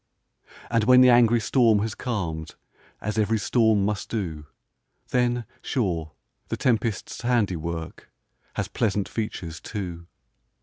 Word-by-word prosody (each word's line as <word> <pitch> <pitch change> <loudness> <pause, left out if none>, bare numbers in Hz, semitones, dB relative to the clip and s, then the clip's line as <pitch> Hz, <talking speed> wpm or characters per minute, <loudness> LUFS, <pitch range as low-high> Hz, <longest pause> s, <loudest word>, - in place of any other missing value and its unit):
And 115 -2 +2
when 125 +1 +7
the 130 -1 +7
angry 120 -1 +5
storm 115 -1 +3
has 110 -1 -2
calm'd, 85 -10 -4 0.5
As 105 +1 -2
ev'ry 110 +1 +2
storm 110 -1 +2
must 105 -1 -2
do, 80 -9 -4 0.6
Then, 120 -1 +1 0.2
sure, 85 - -2 0.3
the - - -3
tempest's 115 -3 -1
handiwork, 90 -9 -2 0.4
Has - - -1
pleasant 105 -3 0
features, 85 -7 -4
too. 90 -5 -6
105 Hz, 120 wpm, -25 LUFS, 85-120 Hz, 0.6 s, when